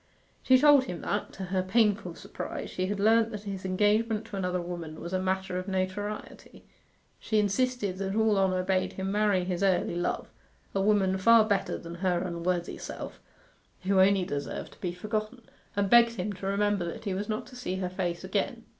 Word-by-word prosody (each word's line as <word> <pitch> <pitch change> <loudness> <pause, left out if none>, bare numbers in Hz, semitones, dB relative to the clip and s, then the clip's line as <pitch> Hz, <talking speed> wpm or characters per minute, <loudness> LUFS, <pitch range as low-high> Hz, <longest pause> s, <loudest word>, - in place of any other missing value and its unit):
She 260 - +5
told 285 -1 +6
him 180 -7 -6
that, 205 - -2
to 190 - -6
her 185 - +2
painful 200 -2 +1
surprise, - - -6
she 185 0 -2
had 205 +1 -2
learnt 225 +2 +4
that 210 -2 -7
his 195 -2 -6
engagement 210 +3 +1
to - - -8
another 180 -1 -1
woman 170 -3 -6
was 170 +2 -6
a 185 - +1
matter 190 -1 -1
of 185 - -7
notoriety. 195 +2 -4 0.5
She 220 - -1
insisted 210 -1 0
that 195 0 -2
all 220 -1 +3
honour 185 -1 +2
bade 185 0 0
him 190 0 -3
marry 205 -3 +2
his 180 0 -2
early 190 -2 +2
love 175 +1 -2 0.5
a 195 - +1
woman 195 -2 +2
far 230 +2 +6
better 200 -3 0
than 170 0 -9
her 180 -2 +2
unworthy 175 0 -2
self, - - -7 0.6
who 190 0 +2
only 190 -1 +4
deserved 145 -3 -4
to - - -22
be 180 - -1
forgotten, 215 +6 -4 0.3
and 200 0 +1
begged 235 +2 +6
him 205 +1 -3
to 195 0 -6
remember 205 -1 +1
that 170 - -6
he 195 - -1
was 205 +3 -3
not 215 +3 -2
to 255 - -13
see 245 -7 -3
her 190 -1 -2
face 180 -2 -3
again. - - -2
195 Hz, 195 wpm, -28 LUFS, 185-210 Hz, 0.6 s, told